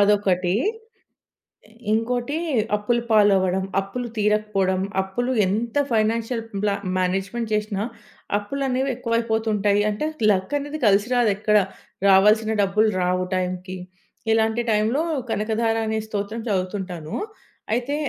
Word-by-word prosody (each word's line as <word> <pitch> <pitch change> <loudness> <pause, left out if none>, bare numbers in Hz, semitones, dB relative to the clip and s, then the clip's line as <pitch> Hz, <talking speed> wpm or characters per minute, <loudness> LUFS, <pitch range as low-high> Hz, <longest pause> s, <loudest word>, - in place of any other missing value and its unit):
అదొకటీ. 195 -3 +2 1.4
ఇంకోటి, 245 +5 0 0.4
అప్పులు 235 +3 0
పాలవ్వడం. 195 -3 +4 0.2
అప్పులు 240 +5 -5
తీరకపోవడం. 210 -3 +1 0.2
అప్పులు 245 +7 -2
ఎంత 225 +6 -2 0.2
ఫైనాన్‌షియల్ 225 +1 0 0.2
బ్ల 210 - +2 0.3
మ్యానేజ్‌మెంట్ 195 +5 -1
జేసినా, 210 -1 -1 0.5
అప్పులనేవి 265 +4 -1
ఎక్కువయిపోతుంటాయి. 220 -4 +1
అంటే, 210 +9 -2 0.2
లక్ 190 +5 0
అనేది 290 +2 -6
కలిసి 205 +3 +3
రాదెక్కడ. 210 -3 +3 0.5
రావాల్సిన 210 +3 +5
డబ్బులు 210 +3 +2
రావు 180 0 +1
టైం‌కి. 185 0 -3 0.5
ఇలాంటి 225 +1 +2
టైంలో 220 +8 +2 0.3
కనకధార 225 +1 0
అనే 220 0 0
స్తోత్రం 215 +1 -4
చదువుతుంటాను. 185 -4 -3 0.6
అయితే 250 +4 -1
210 Hz, 100 wpm, -23 LUFS, 195-230 Hz, 1.4 s, రావాల్సిన